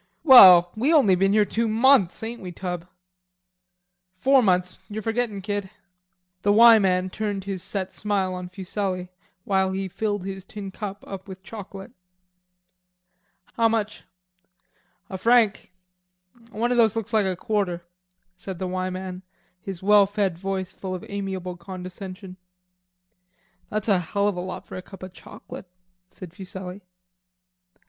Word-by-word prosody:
"Well, 185 - +9
we 255 +8 +1
only 275 - +5
been 195 +2 +2
here 210 -1 +4
two 230 +3 -1
months, 225 -3 +3
ain't 235 +2 -6
we, 180 -2 -7
Tub?" 175 -1 -5 1.3
"Four 265 +7 +4
months; 180 -4 +1
you're 215 +1 -5
forgettin', 225 -3 -2
kid." 205 -1 -3 0.7
The 205 - +2
"Y" 225 +1 +8
man 185 -1 +1
turned 205 -2 -3
his 195 -2 -4
set 190 0 -3
smile 200 -3 -1
on 180 0 -6
Fuselli 185 -1 -4 0.3
while 190 -1 +1
he 195 0 -3
filled 205 0 -3
his 195 -1 -6
tin 200 -1 -8
cup 200 0 -7
up 195 0 -8
with 190 -1 -10
chocolate. 195 -2 -9 1.6
"How 230 -1 +2
much?" 215 -2 -2 1.0
"A 190 - -7
franc; 230 -2 +2 0.8
one 235 +2 -1
of 245 - +2
those 225 -2 +4
looks 225 -2 -4
like 210 -3 +3
a 185 - -1
quarter," 190 -4 -2 0.5
said 185 0 -7
the 185 - -4
"Y" 185 0 -2
man, 185 0 -6 0.4
his 190 -2 -7
well 205 0 +6
fed 200 -3 -1
voice 190 +1 -4
full 185 -1 -5
of 180 - -8
amiable 190 -3 -4
condescension. 185 +1 -9 1.3
"That's 215 0 -3
a 195 -4 +3
hell 200 +4 -1
of 205 - 0
a 180 - -4
lot 185 +1 -7
for - - -10
a - - -6
cup 190 0 -13
of 185 -1 -9
chauclate," - - -11 0.4
said 180 -3 -11
Fuselli. 190 0 -8
195 Hz, 150 wpm, -24 LUFS, 185-210 Hz, 1.6 s, Well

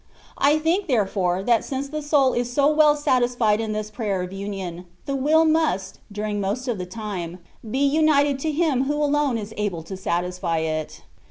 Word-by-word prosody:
I 290 +2 +4
think, 340 +5 0
therefore, 195 - 0
that 235 0 +3
since 270 0 -4
the 305 +1 -4
soul 285 -3 +3
is 245 0 -1
so 280 +3 +3
well 300 -1 +5
satisfied 245 -6 +1
in 220 -1 -3
this 215 0 -4
Prayer 205 -5 -2
of 180 +1 -7
Union, 190 -3 -6 0.2
the 275 - -2
will 310 +4 +3
must, 310 - 0
during 210 0 -3
most 210 +7 -2
of 235 -6 -2
the 180 - -5
time, 185 -4 -5 0.3
be 270 +5 +1
united 285 -1 +3
to 310 +3 -1
Him 295 -4 +1
who 290 +2 0
alone 295 -3 +1
is 215 0 -6
able 195 -6 -2
to 190 - -7
satisfy 180 -2 -2
it. 155 -1 -3
235 Hz, 185 wpm, -23 LUFS, 195-290 Hz, 0.3 s, well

